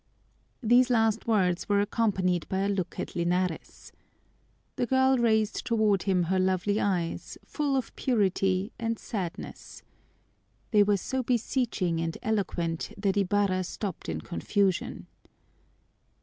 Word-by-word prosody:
These 245 +3 +5
last 225 -2 +2
words 185 -6 +1
were 200 0 +3
accompanied 195 -5 0
by 190 0 0
a 200 - +1
look 195 -4 -2
at - - -5
Linares. 175 0 -2 0.8
The 245 -2 -1
girl 260 0 +3
raised 220 -2 +1
toward 215 -5 +2
him 185 -3 +1
her 185 +3 0
lovely 190 +3 +1
eyes, 175 -4 -2
full 290 -3 -1
of 260 -3 -2
purity 195 -3 +1
and 230 -1 -1
sadness. 185 -7 -6 0.9
They 210 - +5
were 205 0 +3
so 260 +7 -2
beseeching 230 -8 0
and 165 0 -3
eloquent 175 -6 -2
that 200 -1 0
Ibarra 200 -1 +1
stopped 185 - -5
in 80 -1 -3
confusion. 190 - -1
200 Hz, 125 wpm, -28 LUFS, 185-225 Hz, 0.9 s, These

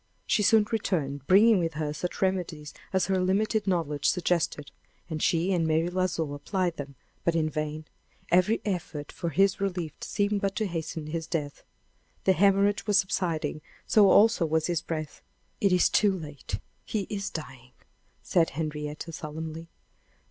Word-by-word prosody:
She - - +2
soon 215 +1 +5
returned, 145 - -1
bringing 210 +2 +6
with 165 -2 -2
her 150 -1 -2
such 180 +5 -3
remedies 175 -6 -2 0.2
as 190 -1 +2
her 190 -1 +1
limited 210 +3 +1
knowledge 150 -6 +1
suggested. 170 -5 0 0.4
And 155 -1 -3
she 175 +3 +2
and 165 -3 +1
Mary 160 +2 +1
L'Oiseau 175 -5 -1
applied 175 +4 -2
them; 140 -1 -7 0.3
but 170 - +1
in 155 -1 +1
vain! 155 0 -3 0.5
Every 185 +6 +3
effort 170 -7 -4
for 170 - -4
his 195 +5 +2
relief 180 -5 -2
seemed 205 0 0
but 195 0 -1
to 220 - 0
hasten 165 -3 -4
his 160 +1 -4
death. 145 -4 -3 0.6
The 190 - +4
hemorrhage 200 +3 +3
was 205 -1 +4
subsiding; 170 -5 -1 0.2
so 205 -3 +5
also 220 -2 +5
was 160 0 +1
his 175 -3 0
breath. 155 -2 -5 0.4
"It 200 - +3
is 180 -1 +5
too 200 -3 +3
late; 145 - -6 0.3
he 215 - -2
is 200 -1 -2
dying!" 130 -5 -8 0.5
said 165 -2 +2
Henrietta, 150 +1 -4
solemnly. 160 +1 -6
170 Hz, 155 wpm, -28 LUFS, 155-195 Hz, 0.6 s, bringing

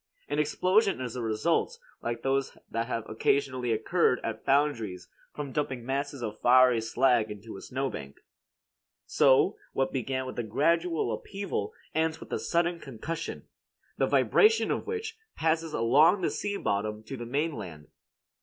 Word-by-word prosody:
An 145 - -1
explosion 185 - +2
is 125 -2 -4
the 125 - -4
result, 140 - 0 0.2
like 120 0 -3
those 135 0 0
that 115 0 -1
have 115 -3 -3
occasionally 125 +1 0
occurred 125 +5 +2
at 110 -1 -4
foundries 115 -11 +1 0.2
from 145 -2 -6
dumping 130 -4 -2
masses 140 0 -3
of 110 -1 -5
fiery 125 -1 +6
slag 120 -1 +2
into 105 +1 -8
a 95 - -9
snowbank. 130 - -4 0.9
So 130 -1 +4 0.2
what 135 - 0
began 130 0 -2
with 130 - -6
a - - 0
gradual 165 +9 +1
upheaval 195 - -4 0.2
ends 160 0 0
with - - -12
a - - 0
sudden 170 0 0
concussion, 155 +6 -6 0.5
the - - +1
vibration 445 +1 +4
of - - -2
which 445 0 -4 0.2
passes 160 0 0
along 150 - +4
the - - 0
sea 205 -1 -2
bottom 105 - -2
to 125 +5 -7
the 120 -2 -7
mainland. 125 - -3
135 Hz, 150 wpm, -28 LUFS, 115-160 Hz, 0.9 s, fiery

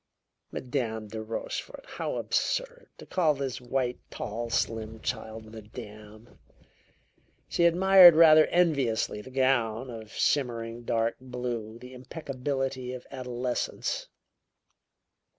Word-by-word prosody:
Madame 115 -5 -3
de 110 +1 -6
Rochefort! 115 - -5
How - - -4
absurd! - - -1
To - - -11
call 160 -5 +2
this 135 -2 -4
white, 125 0 -1
tall, 115 +3 -5
slim 110 -1 -2
child 110 0 -4
madame! 110 +1 -11 1.1
She 170 - +2
admired 180 0 +8
rather 155 -1 +8
enviously 140 -12 +1
the 120 - -12
gown 130 -2 +1
of 110 -2 -9
shimmering 120 -4 -1
dark 115 0 0
blue, 120 -3 -5
the 125 +2 -12
impeccability 130 -1 -4
of 125 -1 -8
adolescence. 125 -1 -3
125 Hz, 105 wpm, -28 LUFS, 115-140 Hz, 1.1 s, admired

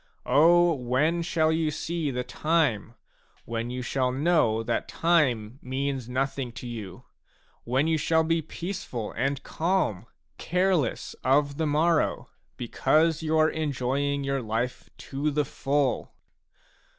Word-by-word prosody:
O 170 +5 +5
when 145 +6 0
shall 160 -2 +1
you 160 -1 +1
see 160 0 -2
the 125 -1 -2
time 125 -6 0 0.5
when 115 +1 -3
you 125 +1 -4
shall 130 0 0
know 135 -6 +2
that 115 +1 -1
time 130 -9 +1
means 130 -1 -3
nothing 135 0 -2
to 125 - -8
you, 110 -6 -7 0.6
when 130 +5 +1
you 160 -1 +1
shall 160 +2 +2
be 165 +1 +1
peaceful 165 - -5
and 140 +1 -2
calm, 160 - -1 0.3
careless 180 -7 0
of 140 +2 +2
the 160 - 0
morrow, 155 +2 +1 0.3
because 155 +7 +2
you 160 0 0
are 155 0 +4
enjoying 140 -1 -1
your 135 -1 -1
life 115 +2 -3
to 140 +2 -3
the 150 0 0
full 140 -2 -1
140 Hz, 130 wpm, -27 LUFS, 125-160 Hz, 0.6 s, O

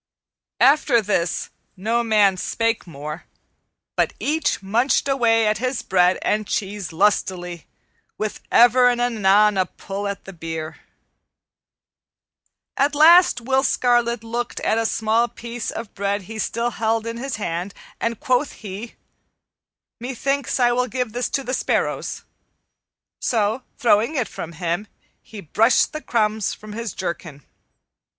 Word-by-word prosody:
After 275 -3 +5
this 190 -5 -1 0.3
no 225 +5 0
man 210 -4 +4
spake 230 +3 -1
more, 150 +1 -7 0.7
but - - +1
each 300 -7 0
munched 235 +9 +1
away 230 -4 +3
at 210 -1 +1
his 255 0 -2
bread 180 -1 +3
and 215 0 0
cheese 200 -2 -3
lustily, 180 -2 0 0.5
with 215 -1 -4
ever 245 +1 +6
and 245 -1 0
anon 210 -4 +3
a 185 - +2
pull 200 +1 -6
at 200 0 -5
the 195 - -9
beer. 160 -2 -6 2.0
At 285 +2 +1
last 325 -3 +6
Will 265 +3 +2
Scarlet 240 -3 +1
looked 235 +1 -4
at 220 - +1
a 225 - +1
small 225 +2 +1
piece 235 0 -6
of 225 -2 -6
bread 200 0 -2
he 220 +3 -8
still 235 +2 -1
held 225 0 -1
in 230 0 -4
his 270 +3 -4
hand, 180 -2 -3 0.3
and 230 -1 -2
quoth 255 +3 0
he, 210 +3 -8 1.0
"Methinks 265 +2 -2
I 240 -1 +4
will 250 +1 +1
give 250 -3 -3
this 245 +1 -2
to 275 - -1
the 255 - -4
sparrows." - - -1 1.0
So, 220 +1 0 0.2
throwing 235 +4 +2
it 250 -5 0
from 165 - -7
him, 175 +4 -2 0.3
he 215 -2 -10
brushed 220 - +2
the 310 - -5
crumbs 215 -5 0
from 215 -1 -11
his 230 0 -5
jerkin. 170 -5 -5
225 Hz, 140 wpm, -22 LUFS, 200-245 Hz, 2.0 s, ever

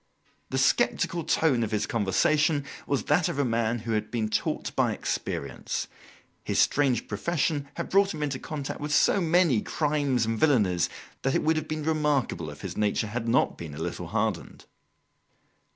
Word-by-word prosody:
The - - -2
sceptical 170 -2 +2
tone 145 -6 +2
of 110 - -1
his 105 -1 0
conversation 145 - +2 0.2
was 140 -2 0
that 180 - +2
of - - -4
a 140 - +2
man 115 -1 0
who 115 0 -5
had 110 -1 -1
been 110 -2 -1
taught 105 - -2
by - - +2
experience. - - -3 0.6
His - - -2
strange 135 -5 +2
profession 145 - -1
had - - -4
brought 195 +1 +4
him 150 - -4
into 140 -3 -2
contact 145 -3 -5
with 150 0 -3
so 190 +6 +4
many 165 - +3
crimes 145 -5 0
and 115 0 -2
villanies 105 - +3 0.3
that 135 - 0
it - - +1
would 160 +1 +3
have 155 0 -2
been 155 -1 -3
remarkable 145 - 0
if 75 0 -10
his - - -6
nature 105 +1 +1
had 115 +2 -4
not 120 +3 +2
been 80 -4 -7
a 80 - -4
little 85 - -4
hardened. - - -2
135 Hz, 175 wpm, -27 LUFS, 110-155 Hz, 0.6 s, brought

